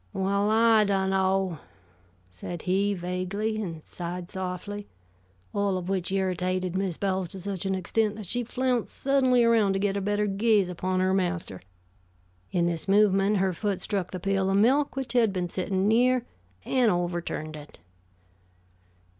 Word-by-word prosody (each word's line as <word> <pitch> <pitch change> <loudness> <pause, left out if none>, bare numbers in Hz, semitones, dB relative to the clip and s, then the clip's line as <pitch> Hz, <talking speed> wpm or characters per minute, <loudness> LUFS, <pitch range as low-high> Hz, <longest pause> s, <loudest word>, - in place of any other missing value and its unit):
"Well, 200 +2 +1
I 225 0 +5
dunno," 190 -3 +1 0.7
said 155 - -7
he, 200 +2 +1
vaguely, 185 +5 -2
and 165 -6 -6
sighed 175 0 -6
softly; 190 +2 -5 0.7
all 200 -2 0
of 180 0 -5
which 190 -2 -1
irritated 185 -1 -1
Mrs. 190 -3 -2
Bowles 190 -2 0
to 190 - -8
such 195 0 -4
an 190 - 0
extent 210 +3 0
that 215 -1 -7
she 245 +7 -2
flounced 250 0 -1
suddenly 260 -3 +3
around 225 -4 +4
to 195 - 0
get 200 0 0
a 200 - -1
better 205 +1 0
gaze 205 -1 +2
upon 185 +1 -1
her 185 0 +2
master. 180 - -2 0.9
In 175 -1 +1
this 170 0 -2
movement, 200 0 +4
her 190 -1 +1
foot 200 +1 -2
struck 195 -4 -2
the 185 - -5
pail 195 +1 0
of 195 - +2
milk 265 +8 +3
which 270 -2 -4
had 235 -4 +4
been 180 -2 -2
sitting 190 +2 -1
near, 245 +2 +3 0.4
and 250 -3 +3
overturned 175 -4 -2
it. 150 -1 -12
195 Hz, 155 wpm, -27 LUFS, 180-210 Hz, 0.9 s, I